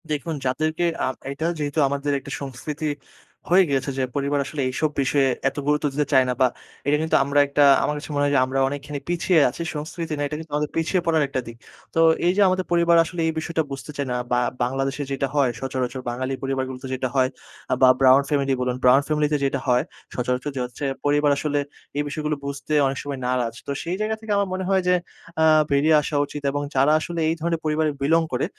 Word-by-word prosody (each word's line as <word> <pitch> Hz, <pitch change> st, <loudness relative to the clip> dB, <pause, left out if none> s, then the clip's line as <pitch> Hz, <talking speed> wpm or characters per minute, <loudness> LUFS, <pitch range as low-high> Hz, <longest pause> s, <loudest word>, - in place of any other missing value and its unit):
দেখুন 150 Hz, +2 st, -2 dB
যাদেরকে 155 Hz, +6 st, 0 dB, 0.2 s
আম 130 Hz, -, -1 dB, 0.2 s
এইটা 140 Hz, +4 st, -3 dB
যেহেতু 145 Hz, +1 st, -1 dB
আমাদের 140 Hz, +1 st, -2 dB
একটা -, -, -10 dB
সংস্কৃতি 145 Hz, +3 st, -5 dB, 0.6 s
হয়ে 185 Hz, +2 st, +6 dB
গিয়েছে 140 Hz, 0 st, 0 dB
যে -, -, +1 dB
পরিবার 140 Hz, 0 st, 0 dB
আসলে 145 Hz, +1 st, -4 dB
এইসব 155 Hz, +4 st, 0 dB
বিষয়ে 135 Hz, 0 st, +2 dB, 0.2 s
এত -, -, -17 dB
গুরুত্ব 150 Hz, 0 st, +2 dB
দিতে 145 Hz, +1 st, 0 dB
চায় 130 Hz, -1 st, +6 dB
না -, -, +1 dB
বা 130 Hz, -, +6 dB, 0.4 s
এটা 150 Hz, +1 st, +3 dB
কিন্তু 160 Hz, -, +1 dB
আমরা 140 Hz, +1 st, +1 dB
একটা 145 Hz, +1 st, +3 dB, 0.2 s
আমার 150 Hz, -, 0 dB
কাছে 145 Hz, -, -8 dB
মনে 145 Hz, -, +1 dB
হয় 145 Hz, -, +1 dB
যে -, -, +5 dB
আমরা 130 Hz, +1 st, -2 dB
অনেকখানি 145 Hz, +1 st, -5 dB
পিছিয়ে 175 Hz, 0 st, +2 dB
আছি। 145 Hz, -, -8 dB
সংস্কৃতি 160 Hz, +2 st, -5 dB
না, -, -, -3 dB
এটা 150 Hz, -, -5 dB
কিন্তু 160 Hz, -1 st, -10 dB
আমাদের 150 Hz, 0 st, -1 dB
পিছিয়ে 170 Hz, +3 st, +1 dB
পড়ার 160 Hz, -2 st, +3 dB
একটা 130 Hz, -1 st, -2 dB
দিক। 115 Hz, 0 st, -9 dB, 0.4 s
তো -, -, +2 dB, 0.3 s
এই 175 Hz, -, +5 dB
যে -, -, +4 dB
আমাদের 185 Hz, 0 st, 0 dB
পরিবার 170 Hz, 0 st, +4 dB
আসলে 175 Hz, +1 st, -7 dB
এই 160 Hz, -, 0 dB
বিষয়টা 160 Hz, 0 st, -1 dB
বুঝতে 135 Hz, +2 st, -6 dB
চায় 140 Hz, -1 st, -2 dB
না। -, -, 0 dB, 0.2 s
বা 125 Hz, -, +3 dB, 0.2 s
বাংলাদেশে 135 Hz, +3 st, -1 dB
যেইটা 140 Hz, 0 st, -1 dB
হয়, 140 Hz, -3 st, +3 dB
সচরাচর 130 Hz, 0 st, -3 dB
বাঙালি 130 Hz, +2 st, -3 dB
পরিবারগুলোতে 130 Hz, -1 st, -3 dB
যেটা 130 Hz, 0 st, -2 dB
হয় 130 Hz, -1 st, +3 dB, 0.4 s
আ -, -, +4 dB
বা 130 Hz, -, +8 dB
ব্রাউন 135 Hz, +1 st, +6 dB
ফ্যামিলি 140 Hz, -2 st, +1 dB
বলুন। 125 Hz, 0 st, 0 dB
ব্রাউন 130 Hz, +2 st, +6 dB
ফ্যামিলিতে 150 Hz, -1 st, +1 dB
যেইটা 135 Hz, 0 st, 0 dB
হয় 125 Hz, 0 st, +3 dB, 0.3 s
সচরাচর 125 Hz, +3 st, -1 dB
যে 130 Hz, -, -2 dB
হচ্ছে 125 Hz, +3 st, -6 dB, 0.2 s
পরিবার 145 Hz, 0 st, +3 dB
আসলে 145 Hz, 0 st, 0 dB, 0.4 s
এই 145 Hz, -, +1 dB
বিষয়গুলো 150 Hz, +1 st, -2 dB
বুঝতে 140 Hz, +2 st, -4 dB
অনেক 135 Hz, 0 st, -3 dB
সময় 140 Hz, -2 st, -5 dB
নারাজ। 125 Hz, -2 st, 0 dB
তো -, -, -2 dB
সেই 170 Hz, +2 st, -2 dB
জায়গা 215 Hz, +1 st, 0 dB
থেকে 220 Hz, -1 st, -6 dB
আমার 200 Hz, 0 st, +1 dB
মনে 190 Hz, 0 st, -2 dB
হয় 190 Hz, -1 st, +3 dB
যে 180 Hz, -, +5 dB, 0.5 s
আ -, -, +5 dB, 0.3 s
বেরিয়ে 150 Hz, +3 st, +4 dB
আসা 150 Hz, -, -4 dB
উচিত 145 Hz, +1 st, -7 dB
এবং 145 Hz, +1 st, -2 dB
যারা 135 Hz, +3 st, +4 dB
আসলে 170 Hz, +2 st, -4 dB
এই 165 Hz, -, 0 dB
ধরনের 165 Hz, 0 st, -1 dB
পরিবারে 155 Hz, 0 st, +1 dB
বিলং 160 Hz, +4 st, +3 dB
করে 125 Hz, -, +1 dB
145 Hz, 215 wpm, -23 LUFS, 135-155 Hz, 0.6 s, বা